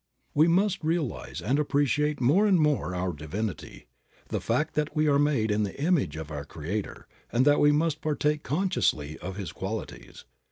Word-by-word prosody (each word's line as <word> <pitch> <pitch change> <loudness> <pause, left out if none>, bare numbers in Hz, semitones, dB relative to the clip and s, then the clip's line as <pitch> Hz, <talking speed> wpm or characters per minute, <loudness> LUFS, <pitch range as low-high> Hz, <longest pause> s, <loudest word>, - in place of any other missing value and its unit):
We 155 +3 +5
must 190 +2 +2
realize 160 -4 -2
and 135 +7 +1
appreciate 145 0 +1
more 155 - +4
and 190 -4 +4
more 150 -11 +1
our 90 0 -1
divinity, 80 - -5 0.4
the - - -2
fact 155 +1 0
that 150 -1 -1
we 155 0 +2
are 140 -1 +4
made 140 -7 +2
in 105 +1 +1
the 105 +5 -3
image 145 - +1
of 80 -1 -7
our 70 -2 -4
Creator 85 +8 -5 0.3
and 125 +2 +2
that 145 0 +5
we 145 - +5
must 155 +1 0
partake 150 0 0
consciously 135 - -1
of 95 +1 -6
His 100 -3 -5
qualities. 105 +3 -7
145 Hz, 175 wpm, -27 LUFS, 95-155 Hz, 0.4 s, We